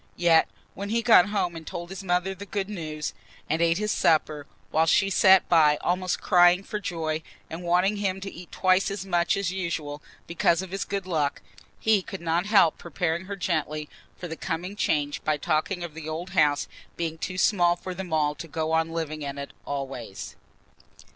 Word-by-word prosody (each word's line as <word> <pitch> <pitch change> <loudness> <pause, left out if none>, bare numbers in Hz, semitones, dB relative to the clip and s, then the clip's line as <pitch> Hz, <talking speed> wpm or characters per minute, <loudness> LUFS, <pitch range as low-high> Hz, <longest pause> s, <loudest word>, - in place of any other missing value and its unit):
Yet 170 -2 +5 0.3
when 200 +2 -6
he 230 +1 0
got 230 -2 +6
home 180 -4 -1
and 160 -1 -9
told 175 +1 -6
his 190 0 -7
mother 180 +1 0
the 200 +2 -10
good 200 -1 -3
news, 155 -6 -4 0.3
and 160 +2 0
ate 165 0 +3
his 210 +1 -1
supper, 155 -2 +1 0.2
while 160 +1 +3
she 195 +4 +3
sat 190 0 +6
by 155 -3 +5
almost 180 0 0
crying 175 +1 +5
for 210 - -4
joy 160 -5 -3 0.3
and 165 +2 -5
wanting 180 +4 +2
him 190 -2 -1
to 195 - -6
eat 175 0 -11
twice 185 +1 +2
as 200 -1 -5
much 175 -1 +1
as 195 -3 -1
usual 165 -6 -4 0.2
because 170 +1 +1
of 185 - -9
this 195 0 -3
good 200 -2 -3
luck, 155 -6 -1 0.4
he 220 -3 +3
could 195 +1 -7
not 170 +3 0
help 195 -7 +4
preparing 170 +2 -2
her 200 +1 -5
gently 155 -5 -2 0.3
for 180 - -6
the 160 - -5
coming 175 +5 -4
change 145 -7 0
by 155 -1 +1
talking 155 +5 -1
of 170 -3 -6
the 160 0 -7
old 165 +4 -5
house 150 -5 +2 0.3
being 165 -1 -3
too 185 +2 -4
small 175 -3 +3
for 185 +1 -7
them 180 -1 -7
all 150 -2 +2
to 165 - -9
go 160 0 -2
on 160 0 +2
living 160 -2 -4
in 140 -1 -5
it 140 0 -7
always. 135 -7 -6
175 Hz, 195 wpm, -26 LUFS, 155-190 Hz, 0.4 s, got